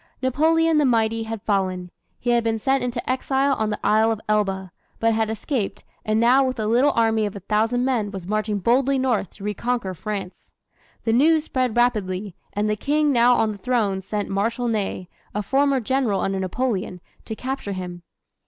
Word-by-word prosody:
Napoleon 320 +4 +2
the - - +3
mighty 225 -2 +2
had 225 -2 -5
fallen. 185 -3 -1 0.3
He 240 - 0
had 235 -1 +3
been 225 -1 0
sent 270 +4 +1
into 245 -1 -3
exile 265 +2 +1
on 220 -1 0
the 210 - -2
Isle 220 +1 +4
of 220 - -2
Elba, 195 -3 0 0.3
but 225 0 +2
had 220 0 0
escaped, 220 -2 -3 0.2
and 215 0 +1
now 250 +4 +5
with 255 -2 -2
a 215 - -1
little 240 +6 +4
army 225 -2 +2
of 205 - -8
a - - -5
thousand 225 +5 +1
men 235 -6 0
was 190 -3 -7
marching 215 +1 -1
boldly 260 +7 +2
north 245 -8 -1
to 200 - -12
reconquer 210 -1 -2
France. 195 0 -6 0.5
The 225 - +1
news 310 +5 +4
spread 255 -6 -1
rapidly, 205 -6 0 0.2
and 205 +1 0
the 210 - +1
King 295 +6 +1
now 245 -1 +5
on 220 -2 +1
the 205 - -8
throne 215 -5 0
sent 205 +1 -3
Marshal 230 +5 -1
Ney, 200 -5 -2 0.3
a 210 - -1
former 275 +3 +2
General 245 -4 0
under 195 0 -1
Napoleon, 190 -1 -2 0.3
to 220 - -5
capture 255 -4 -4
him. 180 -2 -6
225 Hz, 190 wpm, -23 LUFS, 205-255 Hz, 0.5 s, now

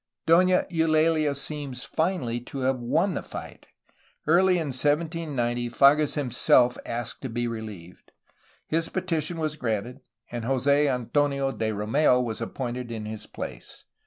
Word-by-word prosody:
Dona 180 +2 +4
Eulalia 155 -2 +2
seems. 140 -3 -4
finally 160 -9 -1
to 130 +3 -7
have 130 0 +1
won 160 +11 +1
the - - -3
fight. - - -9 0.6
Early 180 +4 +4
in 160 -4 -2
1790 145 -4 0
Fages 140 +4 +4
himself 125 -2 +3
asked 120 0 -4
to 130 - -4
be 120 +1 -2
reheved. 110 -7 -7 0.6
His 165 +1 +1
petition 170 -3 -2
was 155 -2 -2
granted, 120 +1 -3 0.3
and 120 -1 -4
Jose 140 +4 +2
Antonio 140 +2 0
de 110 -4 -2
Romeu 120 +6 +2
was 115 -2 -3
appointed 125 0 -4
in 110 -2 -5
his 110 0 -7
place. - - -8
135 Hz, 135 wpm, -26 LUFS, 120-155 Hz, 0.6 s, Dona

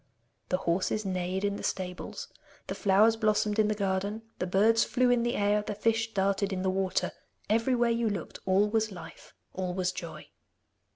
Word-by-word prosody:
The 185 - +2
horses 190 +4 -1
neighed 185 +1 -2
in 200 0 -1
the - - -8
stables, 180 -1 -4 0.4
the - - -4
flowers 210 +3 +4
blossomed 215 -1 +1
in 215 - +4
the 215 - 0
garden, 200 +2 -2 0.2
the 180 - -1
birds 220 +5 +4
flew 250 0 +2
in 245 -1 +3
the 240 +1 0
air, 205 +1 +2
the 210 0 -5
fish 225 +1 0
darted 195 +1 +1
in 185 -1 -2
the 190 - +1
water. 190 0 0 0.4
Everywhere 235 +1 +2
you 230 -1 +1
looked, 200 - -5
all 195 +2 +4
was 220 0 0
life, 180 -3 -11 0.2
all 185 -1 -3
was 185 -1 0
joy! 160 -4 -8
205 Hz, 180 wpm, -29 LUFS, 190-220 Hz, 0.4 s, flowers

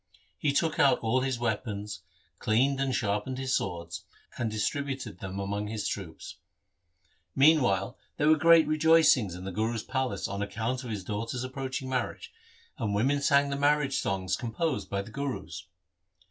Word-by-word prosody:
He 150 - +2
took 160 +3 0
out 135 -3 +5
all 115 +3 +1
his 130 -1 -1
weapons, 105 -4 -3 0.4
cleaned 130 +5 +2
and 135 -2 0
sharpened 105 +5 -1
his 130 -1 0
swords, 85 -3 -4 0.3
and 120 - -1
distributed 130 +3 -3
them 95 0 -5
among 100 +1 -2
his 105 -1 -3
troops. 85 -5 -6 1.0
Meantime, 130 - +4 0.2
there 150 - +2
were 155 - +7
great 165 +1 +6
rejoicings 155 - +4
in 90 - -8
the 95 - -4
Guru's 110 +3 -1
palace 130 -7 -2
on 100 +1 -4
account 115 +5 -2
of 125 - -7
his 105 -4 -4
daughter's 115 +5 -3
approaching 130 0 -4
marriage, 130 -2 -3 0.5
and 105 -3 -1
women 135 +7 +2
sang 140 0 +3
the - - 0
marriage 145 -1 +2
songs 95 -2 -1
composed 130 +7 -2
by 100 0 -2
the 115 - -12
Gurus. 130 - -5
120 Hz, 160 wpm, -29 LUFS, 100-140 Hz, 1.0 s, were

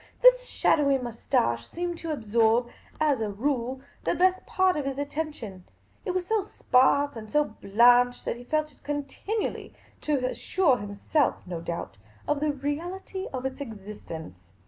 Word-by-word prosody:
This - - +7
shadowy 280 -3 +3
moustache 165 - -1
seemed 345 0 -4
to 330 - -4
absorb, 230 -2 +2 0.3
as 290 -6 +2
a 215 - -1
rule, 255 +3 -1 0.2
the - - +1
best 370 +1 +3
part 375 -1 +3
of 295 - -2
his 275 -1 -2
attention; 285 - -4 0.4
it - - -3
was 365 0 0
so 440 +2 +1
sparse 280 -6 +3
and 215 -2 -8
so 300 0 +4
blanched 245 +2 +4
that - - -1
he 245 - -10
felt 305 +3 -1
it 275 - -23
continually— 295 +9 -3 0.3
to 285 -4 0
assure 275 +1 +2
himself, 205 +8 0
no 175 -2 -5
doubt, 170 -11 -5 0.3
of 295 -1 +1
the 300 0 +1
reality 345 +7 -4
of 255 -1 -4
its 265 +1 -4
existence. 170 - -9
275 Hz, 155 wpm, -27 LUFS, 225-310 Hz, 0.4 s, This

